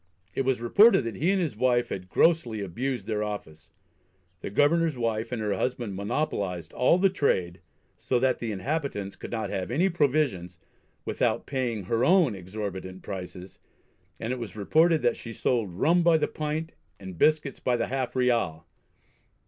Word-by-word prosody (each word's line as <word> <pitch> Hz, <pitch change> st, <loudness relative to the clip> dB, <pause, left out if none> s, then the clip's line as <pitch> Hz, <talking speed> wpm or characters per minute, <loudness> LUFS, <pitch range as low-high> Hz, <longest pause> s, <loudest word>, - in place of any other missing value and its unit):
It 135 Hz, -, -1 dB
was 130 Hz, -2 st, +1 dB
reported 200 Hz, -, +5 dB
that 115 Hz, -4 st, -5 dB
he 165 Hz, +6 st, +1 dB
and 195 Hz, 0 st, +2 dB
his 160 Hz, -11 st, -2 dB
wife 120 Hz, +1 st, +2 dB
had 90 Hz, -1 st, -6 dB
grossly 140 Hz, -, +2 dB
abused 120 Hz, +7 st, -3 dB
their 105 Hz, -1 st, -2 dB
office. 85 Hz, -7 st, -7 dB, 0.7 s
The -, -, -5 dB
governor's 155 Hz, +6 st, +2 dB
wife 115 Hz, -1 st, -2 dB
and 120 Hz, -, -2 dB
her 105 Hz, -1 st, 0 dB
husband 120 Hz, 0 st, -2 dB
monopolised 100 Hz, -, -2 dB
"all 125 Hz, +7 st, +3 dB
the 190 Hz, +1 st, +3 dB
trade," 90 Hz, -, 0 dB, 0.4 s
so 125 Hz, -, 0 dB
that 130 Hz, +1 st, +1 dB
the 115 Hz, -2 st, -3 dB
inhabitants 105 Hz, -3 st, -3 dB
could -, -, -9 dB
not 115 Hz, -2 st, -3 dB
have 95 Hz, -1 st, -3 dB
any 170 Hz, +10 st, +2 dB
provisions 140 Hz, -, 0 dB, 0.5 s
"without -, -, 0 dB
paying 125 Hz, -6 st, -2 dB
her 115 Hz, +6 st, 0 dB
own 170 Hz, -, +4 dB
exhorbitant 95 Hz, -1 st, -6 dB
prices," 90 Hz, 0 st, -8 dB, 0.6 s
and 115 Hz, +3 st, -2 dB
it 130 Hz, -, -5 dB
was 115 Hz, -3 st, -7 dB
reported 160 Hz, -, +3 dB
that 120 Hz, -, +2 dB
she 115 Hz, -, -8 dB
sold 115 Hz, -5 st, 0 dB
"rum 165 Hz, -, +2 dB
by 170 Hz, -1 st, +5 dB
the 155 Hz, -, 0 dB
pint 155 Hz, +2 st, -3 dB, 0.3 s
and 95 Hz, -4 st, -9 dB
biscuits 155 Hz, -2 st, +2 dB
by 125 Hz, -1 st, +1 dB
the -, -, 0 dB
half 130 Hz, -1 st, -3 dB
ryal." 115 Hz, -11 st, +1 dB
120 Hz, 170 wpm, -27 LUFS, 100-150 Hz, 0.7 s, reported